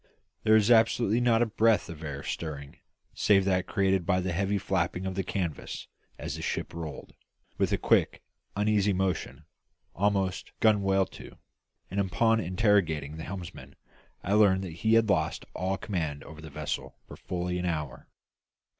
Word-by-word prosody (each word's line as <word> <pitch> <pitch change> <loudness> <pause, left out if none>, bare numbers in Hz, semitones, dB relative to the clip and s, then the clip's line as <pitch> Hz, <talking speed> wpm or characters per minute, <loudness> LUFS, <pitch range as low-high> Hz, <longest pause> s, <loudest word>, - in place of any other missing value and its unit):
There 110 0 +5
was 110 +2 +4
absolutely 115 0 +4
not 120 -1 +4
a - - +2
breath 110 0 +2
of 80 -1 -9
air 70 -3 -5
stirring 70 -4 -5 0.4
save 95 -2 +3
that 95 -2 +1
created 95 -3 +1
by 90 +1 +1
the 95 0 -2
heavy 100 +3 0
flapping 95 -1 -1
of 95 - -2
the 95 - -1
canvas 90 -4 -4 0.3
as - - -5
the - - -7
ship - - -3
rolled, 80 -3 -7 0.5
with - - +2
a - - +2
quick, - - +2 0.3
uneasy 105 -1 +2
motion, 95 -2 -2 0.5
almost 95 -1 0
gunwale 100 -3 +3
to; - - -12 0.5
and 100 - -1
upon 110 +4 +2
interrogating 90 -6 +1
the 80 - -6
helmsman 90 -2 -8 0.5
I 100 - 0
learned 100 -3 +4
that 90 - -5
he 110 0 +4
had 115 -1 +4
lost 100 - 0
all 95 +1 -1
command 80 -9 -3
over 80 +1 -11
the 80 - -9
vessel 75 0 -4
for - - -10
fully 90 0 -3
an 90 - -2
hour. 75 -7 -4
95 Hz, 165 wpm, -28 LUFS, 85-105 Hz, 0.5 s, There